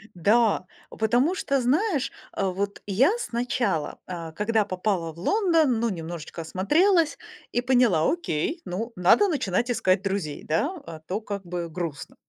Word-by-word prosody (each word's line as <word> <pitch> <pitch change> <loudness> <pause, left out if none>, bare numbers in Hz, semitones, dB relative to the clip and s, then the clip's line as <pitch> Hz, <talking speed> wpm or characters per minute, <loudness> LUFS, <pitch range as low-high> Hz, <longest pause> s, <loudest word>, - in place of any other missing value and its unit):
Да. 210 +2 +3 0.2
О - - -11
потому 245 - +2
что, 275 -6 0
знаешь, 295 - +1 0.2
а 195 -1 -1
вот 200 +2 -3
я 235 - +4
сначала, 235 - -1
а, 170 -3 -6
когда 210 +4 +1
попала 185 -3 -1
в 170 - -14
Лондон, 325 - +2
ну 235 - +1
немножечко 165 -2 -6
осмотрелась 310 - +2 0.3
и - - +1
поняла: 245 -10 +3
"Окей, 330 - -2
ну, 225 +7 -4
надо 180 - +5
начинать 245 - 0
искать 190 -5 +2
друзей, 190 -7 -3
да, 165 - 0
а 160 -1 -8
то 190 +5 -2
как 200 -3 -5
бы 175 -1 -4
грустно". 160 -4 -5
205 Hz, 150 wpm, -25 LUFS, 175-255 Hz, 0.3 s, надо